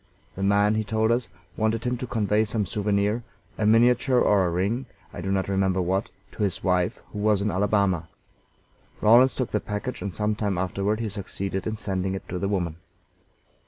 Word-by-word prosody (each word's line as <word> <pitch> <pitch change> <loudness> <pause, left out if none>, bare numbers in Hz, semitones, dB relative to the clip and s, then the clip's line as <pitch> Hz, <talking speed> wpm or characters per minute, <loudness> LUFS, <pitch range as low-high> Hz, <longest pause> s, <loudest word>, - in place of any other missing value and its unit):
The 95 - -7
man, 100 +2 +3
he 110 0 0
told 110 +2 +1
us, 120 +1 +1 0.3
wanted 110 +1 0
him 125 0 0
to 125 - -5
convey 105 -2 +1
some 105 -1 -1
souvenir 105 +3 0 0.3
a 105 - 0
miniature 120 +3 +4
or 100 -5 +3
a - - 0
ring, 100 +9 -1 0.3
I - - -6
do 95 +2 -2
not 95 -1 0
remember 95 -1 +1
what 95 +3 0 0.2
to - - -8
his 100 -4 -1
wife, 90 -1 +1 0.2
who 105 - -4
was 105 -1 +2
in 105 - 0
Alabama. 95 -3 +1 0.9
Rawlins 120 +5 +6
took 130 - -2
the 105 - +1
package, 105 +6 -5
and 100 - -3
some 105 +3 0
time 105 -3 -1
afterward 100 +4 -1
he 110 - -2
succeeded 95 -1 -4
in 110 0 -3
sending 95 -2 -2
it 95 - -7
to 90 - -3
the 100 - -1
woman. 85 -5 -1
105 Hz, 195 wpm, -25 LUFS, 95-110 Hz, 0.9 s, Rawlins